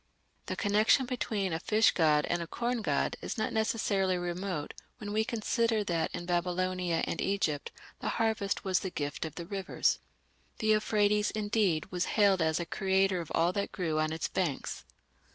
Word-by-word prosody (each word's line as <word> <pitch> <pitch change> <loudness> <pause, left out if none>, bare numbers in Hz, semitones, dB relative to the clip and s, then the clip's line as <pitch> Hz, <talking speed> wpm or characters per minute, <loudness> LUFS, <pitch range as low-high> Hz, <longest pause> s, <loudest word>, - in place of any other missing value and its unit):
The - - -2
connection 215 +5 +3
between 215 -7 -2
a 160 - -1
fish 215 +4 +4
god 155 -3 +3
and 175 - -1
a 170 - -4
corn 240 +5 -2
god - - 0
is - - -4
not 220 - -1
necessarily 200 -4 +1
remote 175 -3 -3 0.2
when 210 -3 -6
we 220 +1 +2
consider 230 -1 0
that 170 -4 0
in 175 - -5
Babylonia 180 0 0
and - - -3
Egypt 175 -7 -1 0.3
the - - -2
harvest 220 -3 0
was 190 -2 +2
the 190 - -4
gift 145 -2 -3
of 160 - -7
the 170 - -6
rivers. 195 +1 0 0.6
The - - -4
Euphrates, 210 -1 +3
indeed, 205 -6 0
was 180 -1 0
hailed 200 -4 +5
as 160 0 +2
a 170 - -2
creator 190 -1 +1
of 165 - -9
all 170 +2 +3
that 200 0 -2
grew 160 -5 -1
on 155 0 +1
its 160 +1 -2
banks. 170 -8 -2
190 Hz, 175 wpm, -31 LUFS, 170-215 Hz, 0.6 s, hailed